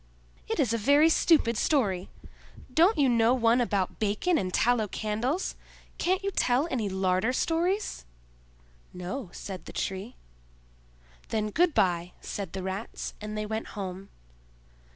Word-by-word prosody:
"It - - -2
is 230 - +2
a 230 - 0
very 285 +8 +5
stupid 305 -9 +3
story! 200 - +1 0.6
Don't 345 - +5
you 285 -2 +4
know 235 0 +4
one 235 0 +3
about 200 -6 -1
bacon 215 - +1
and 185 -1 -2
tallow 230 +1 +2
candles? 220 - -2 0.5
Can't 370 +2 +1
you 395 - -1
tell 260 -3 +2
any 225 -6 -1
larder 190 +4 +1
stories?" 350 +8 0 0.9
"No," 180 +5 -5
said 190 -2 -7
the - - -9
Tree. 195 +5 -4 1.1
"Then 215 -1 -1
good 340 - +2
by," 175 -1 +1
said 195 -5 -6
the 190 -1 -4
Rats 190 +4 -5
and 215 0 -5
they 215 - -2
went 220 +1 -3
home. 190 0 -5
225 Hz, 140 wpm, -28 LUFS, 195-280 Hz, 1.1 s, very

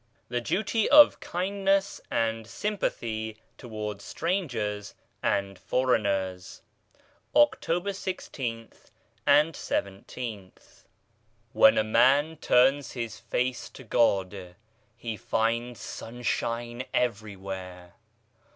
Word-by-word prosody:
THE 120 0 -1
DUTY 215 - 0
OF 295 0 +8
KINDNESS 195 +2 0
AND 115 -1 -1
SYMPATHY 110 - -3 0.2
TOWARDS 105 -4 -6
STRANGERS 120 - -2 0.3
AND 100 -1 -1
FOREIGNERS 100 -7 -1 0.7
October 200 - +3
i6th 130 - -6 0.4
and 150 +3 +5
ijth. 100 -2 -6 0.8
EN - - +4
a - - +4
man 140 +8 +3
turns 135 +2 +3
his 115 -3 -5
face 125 0 -2
to 130 - -12
God 95 -5 +1 0.4
he 115 -2 -5
finds 115 +4 -1
sun 120 +2 -8
shine 120 +1 -2
everywhere. 95 -6 -3
115 Hz, 85 wpm, -27 LUFS, 105-145 Hz, 0.8 s, OF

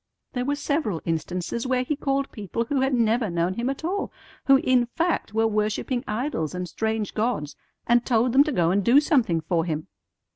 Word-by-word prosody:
"There 250 -1 -2
were 285 +2 0
several 285 - -1
instances 180 - -2
where 255 -1 +1
He 295 +4 -1
called 275 -1 -1
people 215 +2 -3
who 270 +2 0
had 265 +1 +1
never 230 -2 +2
known 170 +1 0
Him 235 +5 -2
at 275 +3 -4
all, 395 +4 -2 0.3
who, 275 - +7
in 255 -2 +2
fact, 330 -6 -1
were 225 0 +3
worshipping 215 +3 -1
idols 210 - -2
and 180 0 -3
strange 220 +4 -2
gods, 215 -10 -1 0.3
and 240 0 +3
told 240 0 +2
them 275 +2 +7
to 305 - -1
go 175 - +2
and 200 +2 +1
do 245 +7 +6
something 255 - +2
for 165 +1 0
Him. 155 -2 -4
235 Hz, 195 wpm, -25 LUFS, 185-270 Hz, 0.3 s, who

